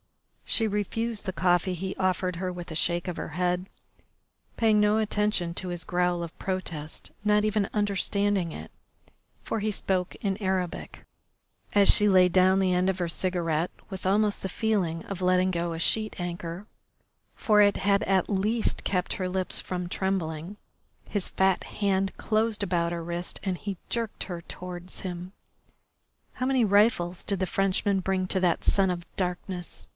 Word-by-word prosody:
She 225 - +2
refused 215 +2 -2
the 190 - -1
coffee 180 0 +2
he 190 +2 -4
offered 185 -1 0
her 185 +1 -2
with 175 -1 -8
a - - -5
shake 170 +3 0
of 180 - -3
her - - -5
head, 180 +3 -1 0.9
paying 220 -2 +4
no 210 +1 +4
attention 210 -5 0
to 185 +1 -5
his 175 -2 -4
growl 180 -1 0
of 170 - -8
protest, 170 -5 -4
not 210 0 +3
even 210 -2 +1
understanding 200 -3 0
it, - - -8 0.7
for 225 - -2
he 215 +1 0
spoke 185 -2 -1
in 195 -2 -2
Arabic. 190 -4 -3 0.7
As 200 -1 +5
she 210 0 +6
laid 180 -2 +5
down 185 +1 +5
the 185 -1 +2
end 180 +1 +2
of 190 - 0
her 175 - 0
cigarette 170 -2 0 0.2
with 190 -2 -7
almost 205 +2 +2
the 190 - -3
feeling 185 -6 -1
of 195 -2 -6
letting 185 0 +3
go 170 -1 -1
a 165 - -4
sheet 215 +5 +2
anchor 175 +1 -5 0.7
for 210 -3 +3
it 205 -1 +4
had 200 0 +2
at 190 -2 +2
least 215 +3 0
kept 180 -2 0
her 185 -1 -2
lips 185 0 +4
from 180 -1 -4
trembling 180 -1 -2 0.5
his 205 -3 -2
fat 190 -1 +2
hand 195 -1 0
closed 220 0 0
about 175 -3 0
her 170 -1 -3
wrist 170 +1 -4
and 185 -3 -1
he 200 -3 -4
jerked 230 -2 -2
her 175 -3 -6
towards 180 +1 -8
him. 180 -1 -6 1.0
"How 255 - -3
many 260 -3 +3
rifles 200 -4 +3
did 200 -2 0
the 190 - +1
Frenchman 195 +1 +1
bring 185 0 0
to 190 - 0
that 175 -3 +1
son 195 -1 +3
of 175 -1 -3
darkness?" 180 -1 -4
185 Hz, 170 wpm, -27 LUFS, 175-205 Hz, 1.0 s, she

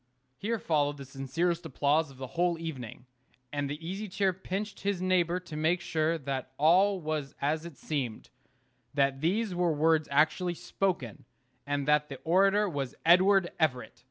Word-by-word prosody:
Here 225 - -2
followed 145 -6 0
the 140 - -8
sincerest 150 +6 -2
applause 145 +3 +1
of 135 - -15
the 130 - -5
whole 175 0 +1
evening; 130 -8 -7 0.5
and 145 -1 -1
the 145 - -3
Easy 195 +4 -4
Chair 190 0 +1
pinched 195 +3 -5
his 200 -2 -1
neighbor 180 -1 +2
to 170 -4 -9
make 160 +4 +1
sure 160 0 0
that 135 -3 -4
all 185 +6 +4
was 155 -4 -3
as 155 +3 -1
it 155 -6 -13
seemed; 130 -8 -4 0.6
that 140 -1 +2
these 195 +5 0
were 175 -1 +1
words 155 +1 +2
actually 160 +5 +2
spoken, 170 - -2 0.4
and 145 -1 -1
that 150 0 +3
the 135 - -6
orator 195 +5 +4
was 140 -7 -4
Edward 185 +2 +5
Everett. 140 -6 -1
160 Hz, 160 wpm, -29 LUFS, 145-180 Hz, 0.6 s, Edward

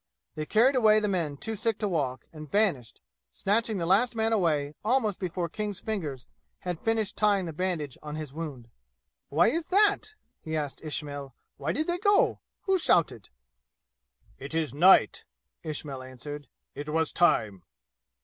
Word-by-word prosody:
They 155 -1 -5
carried 245 +5 +4
away 215 -3 +5
the 210 - -1
men 165 -7 -1
too 220 +9 -4
sick 225 0 0
to 210 - -1
walk 140 -8 -2
and 155 -2 -10
vanished, 190 - 0 0.3
snatching 220 - 0
the 170 - -2
last 215 +8 +3
man 225 0 +1
away 155 -8 +1
almost 220 -3 +1
before 180 -2 -2
King's 210 +2 -4
fingers 150 - -4 0.4
had 180 -3 -4
finished 225 -2 0
tying 200 -3 +2
the 165 - -5
bandage 160 -5 -2
on 150 0 -6
his 155 -3 -6
wound. 140 -8 -7 0.6
"Why 160 +5 +4
is 330 +1 -2
that?" 410 +2 +2 0.3
he 160 0 -4
asked 145 -3 -3
Ismail. 145 -4 -3 0.2
"Why 140 +3 -2
did 310 - -1
they 345 +1 -1
go? 405 0 +3 0.2
Who 385 -1 +2
shouted?" 155 - +2 1.1
"It 140 +4 -6
is 160 -4 -1
night," 180 +6 +5 0.4
Ismail 145 -4 -4
answered. 130 +3 -8 0.3
"It 145 +1 -7
was 160 0 +1
time." 110 - +2
170 Hz, 160 wpm, -28 LUFS, 145-215 Hz, 1.1 s, away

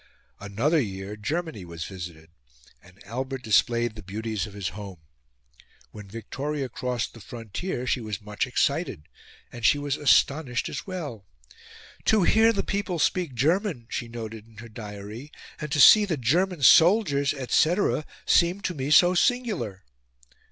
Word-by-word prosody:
Another 120 +11 +1
year, 95 -2 -5
Germany 150 - -4
was 85 -2 -7
visited, 85 -4 -9 0.5
and 95 +2 -20
Albert 130 +4 -5
displayed 120 +1 +2
the 105 - -10
beauties 110 +2 -4
of 105 - -13
his 100 -5 -3
home. 95 0 -9 0.9
When 105 -2 -11
Victoria 135 +6 -4
crossed 125 0 -3
the 115 - -13
frontier, 120 - -5
she 125 0 0
was 105 -3 -5
much 105 +4 -3
excited 140 - -1 0.5
and 120 -1 -10
she 145 - +5
was 145 -1 -2
astonished 140 -2 +2
as - - -6
well. 145 - -6 0.8
"To 215 -3 +4
hear 220 +5 +5
the 205 - -1
people 200 -3 -2
speak 165 -3 0
German," 160 - 0
she 120 - -3
noted 115 -2 -8
in 110 -1 -21
her 115 +1 -10
diary, 105 +4 -9 0.3
"and 150 -2 -6
to 145 - 0
see 210 +9 +9
the 170 -6 -2
German 165 +6 0
soldiers, 160 - +5
etc., 155 - +1 0.2
seemed 180 +3 +3
to 180 - -1
me 135 -3 -4
so 175 +4 +6
singular." 195 - 0
125 Hz, 150 wpm, -26 LUFS, 105-160 Hz, 0.9 s, see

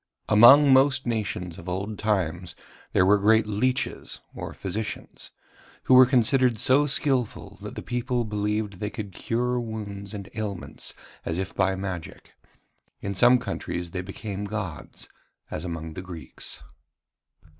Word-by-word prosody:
Among 135 +6 +8
most 135 0 +4
nations 100 -7 -3
of 85 - -7
old 100 +4 -4
times 90 -5 -1 0.4
there 90 - +4
were 100 +2 +5
great 110 +2 +4
leeches 110 +5 -1
or - - -6
physicians, 100 +3 -5 0.5
who - - +3
were 130 0 +9
considered 125 -1 +3
so 135 +7 +4
skilful 135 -4 +1
that - - -7
the - - -6
people 125 0 -1
believed 105 -2 -2
they 105 - -2
could 100 0 -6
cure 125 +5 -1
wounds 105 -3 -6
and 100 -1 -7
ailments 105 -4 -5 0.3
as 80 - -3
if 95 0 -3
by 95 0 +1
magic. 95 -4 -6 0.7
In 100 - -3
some 120 +6 +6
countries 85 -7 -4
they 90 - -3
became 100 +2 -6
gods, 100 -6 -5 0.4
as 75 - -4
among 80 -2 -5
the 90 - -6
Greeks. 85 -7 -6
105 Hz, 140 wpm, -26 LUFS, 95-120 Hz, 0.7 s, were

